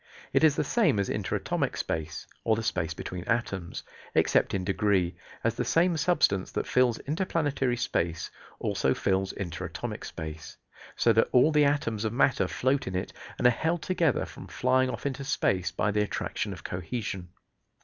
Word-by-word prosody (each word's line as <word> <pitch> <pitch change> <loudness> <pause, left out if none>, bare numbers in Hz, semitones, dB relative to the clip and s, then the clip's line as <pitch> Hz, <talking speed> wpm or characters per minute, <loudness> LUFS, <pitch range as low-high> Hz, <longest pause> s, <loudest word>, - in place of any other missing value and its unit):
It - - +4
is 155 -3 +6
the 150 - +1
same 210 - +2
as 100 - 0
interatomic - - -1
space, 80 -1 -3 0.2
or 110 - +3
the 115 - -3
space 85 -5 -1
between 90 0 -5
atoms, 100 -7 -2 0.3
except - - +3
in 95 - -1
degree, 95 -3 +1 0.3
as 115 - +2
the - - -2
same 170 +1 +3
substance 150 - +2
that - - -1
fills 125 -2 +3
interplanetary 145 -6 0
space 85 -7 -1 0.3
also - - 0
fills 95 0 0
interatomic 90 -4 -5
space, 80 0 -7 0.4
so 115 - +4
that 115 - +3
all 130 +5 +5
the 150 -1 +5
atoms 115 -7 0
of 110 -1 -1
matter 120 -6 +3
float 130 +7 0
in 95 - -3
it 90 - -3 0.2
and - - -2
are 125 - +8
held 160 +7 -1
together 170 -7 +1
from - - -11
flying 130 +1 +2
off - - -5
into 140 0 -2
space 95 -10 +1
by 105 - 0
the 105 0 +1
attraction 105 - -2
of - - -8
cohesion. 95 0 -4
115 Hz, 170 wpm, -28 LUFS, 95-140 Hz, 0.4 s, are